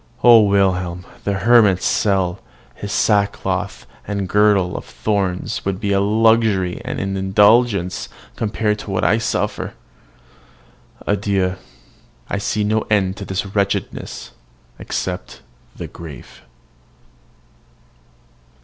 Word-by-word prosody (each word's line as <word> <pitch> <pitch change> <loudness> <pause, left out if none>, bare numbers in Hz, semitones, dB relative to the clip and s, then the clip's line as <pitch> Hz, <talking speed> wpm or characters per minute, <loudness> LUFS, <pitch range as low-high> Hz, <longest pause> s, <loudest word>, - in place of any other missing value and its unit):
O 120 -2 +8
Wilhelm! 90 -3 +1 0.2
the 100 - 0
hermit's 100 -2 +4
cell, 95 -3 +1 0.3
his 100 +8 -7
sackcloth, 100 -1 0 0.2
and 100 -1 -2
girdle 100 -2 +3
of - - -5
thorns 95 - -2
would 95 -1 -2
be 100 -2 0
luxury 105 -2 +2
and - - -4
indulgence 100 +1 +2 0.3
compared 105 -1 -1
with - - -12
what 95 -2 -1
I 110 - +3
suffer. 115 - -2 1.3
Adieu! 100 -2 0 0.7
I 100 - -2
see 105 +1 -1
no 110 +1 +1
end 95 -3 +2
to 100 - -6
this 95 +2 -3
wretchedness 100 0 -3 0.5
except 90 -1 -5 0.3
the - - -6
grave. 75 -7 -11
100 Hz, 105 wpm, -19 LUFS, 95-105 Hz, 1.3 s, O